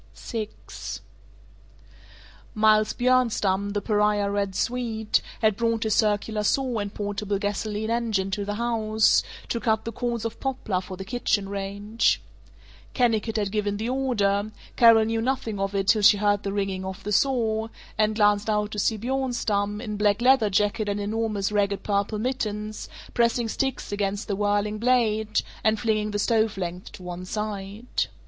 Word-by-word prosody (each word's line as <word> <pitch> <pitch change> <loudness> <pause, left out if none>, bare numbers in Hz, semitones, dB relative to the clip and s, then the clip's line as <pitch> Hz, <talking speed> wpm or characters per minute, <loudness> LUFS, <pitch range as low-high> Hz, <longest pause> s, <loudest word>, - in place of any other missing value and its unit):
VI 220 -3 -4 2.1
Miles 215 0 +4
Bjornstam, 215 -6 +1
the 205 - -1
pariah 210 -1 +1
"Red 200 -2 -1
Swede," 225 -3 0 0.2
had 215 -2 +4
brought 230 0 0
his 220 -1 +1
circular 210 0 +1
saw 250 +2 +1
and 205 -1 -3
portable 205 -1 -2
gasoline 210 +2 -2
engine 220 -5 0
to 205 +1 -1
the 205 +1 -3
house, 220 -2 +2 0.3
to 235 - -1
cut 220 -2 0
the 230 - -3
cords 235 0 -3
of 230 0 -4
poplar 250 -8 -2
for 185 0 -8
the 190 - -6
kitchen 220 -3 0
range. 200 +3 0 0.8
Kennicott 230 -3 +1
had 205 -3 0
given 205 -1 -1
the 225 +3 -2
order; 215 -6 0 0.2
Carol 230 -2 +7
knew 225 0 -1
nothing 230 -4 -2
of 195 0 -2
it 195 0 0
till 215 +1 +5
she 205 0 +7
heard 205 0 +2
the 195 - -3
ringing 195 -2 -2
of 190 +1 -6
the 210 - -4
saw, 225 -2 +1 0.3
and 215 0 +2
glanced 205 0 +3
out 210 0 0
to 210 - -3
see 220 +2 +1
Bjornstam, 225 -4 -1
in 210 -3 -4
black 205 0 +2
leather 250 -3 +4
jacket 205 +2 +1
and 205 0 -1
enormous 210 -1 -1
ragged 200 -1 0
purple 205 +1 0
mittens, 215 -3 -3 0.2
pressing 235 0 +2
sticks 265 +1 -2
against 205 0 -2
the 200 - -1
whirling 205 +1 0
blade, 220 -3 +2 0.2
and 220 -1 +2
flinging 215 -2 0
the 205 - -2
stove 220 -1 +1
lengths 180 0 -5
to 185 - -12
one 180 0 -6
side. 210 +3 -3
210 Hz, 160 wpm, -25 LUFS, 205-225 Hz, 2.1 s, Carol